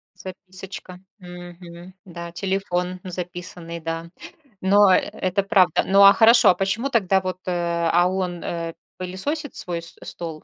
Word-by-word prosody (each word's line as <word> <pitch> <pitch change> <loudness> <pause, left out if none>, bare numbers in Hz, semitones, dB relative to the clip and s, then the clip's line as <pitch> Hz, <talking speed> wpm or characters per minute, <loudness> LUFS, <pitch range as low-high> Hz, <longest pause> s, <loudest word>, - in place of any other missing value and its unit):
Записочка. 185 0 -9 0.2
Мгм. 175 0 -11
Да, 170 -2 -8
телефон 185 0 -2
записанный, 175 -1 -7
да. 165 0 -5 0.5
Но 200 +1 +5
э - - +5
это 190 +2 -1
правда. 190 -3 +3
Ну, 195 +1 +4
а 200 0 +9
хорошо. 230 +2 +6
А - - -1
почему 215 +7 -1
тогда 195 -6 +2
вот, 185 -1 -4
э 185 - -2 0.4
А 175 +1 +4
он, 180 -2 -3
э, 165 -1 -4 0.2
пылесосит 265 - -4
свой 170 -2 -3
с 165 - -3
стол? 160 -3 -6
185 Hz, 145 wpm, -22 LUFS, 175-195 Hz, 0.5 s, а